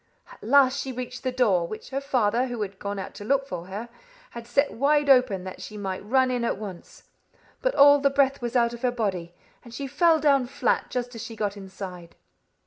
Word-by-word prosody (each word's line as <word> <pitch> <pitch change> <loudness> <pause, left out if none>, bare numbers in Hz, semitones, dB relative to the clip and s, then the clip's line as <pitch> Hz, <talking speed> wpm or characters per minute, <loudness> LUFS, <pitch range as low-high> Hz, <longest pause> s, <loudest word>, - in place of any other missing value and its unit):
At - - -16
last 275 +3 +4
she 265 0 -4
reached 250 0 -6
the 255 - -2
door, 205 -9 +2
which 215 +7 -9
her 270 +1 -2
father, 250 -3 +1
who 240 -3 -3
had 195 -1 -8
gone 200 0 -4
out 190 - -6
to - - -9
look 275 +4 +1
for 180 -6 -6
her, 205 +5 -6 0.4
had 235 -1 -9
set 280 +4 +1
wide 290 +2 +3
open 250 -8 +3
that 185 0 -8
she 215 - -8
might 195 -2 -4
run 260 +4 +2
in 245 -1 -1
at 235 - -1
once; 195 -4 -10 0.6
but - - 0
all 285 +1 +7
the 280 0 +3
breath 275 -1 +1
was 240 +1 -4
out 235 -1 +3
of 235 - -9
her 250 - +2
body, 190 -8 -3 0.3
and 235 -1 -12
she 280 - -4
fell 325 +4 +3
down 280 -4 +3
flat 260 - 0
just 245 0 -3
as 230 - -7
she 225 - -8
got 210 -2 -2
inside." 190 -3 -9
240 Hz, 225 wpm, -25 LUFS, 205-270 Hz, 0.6 s, all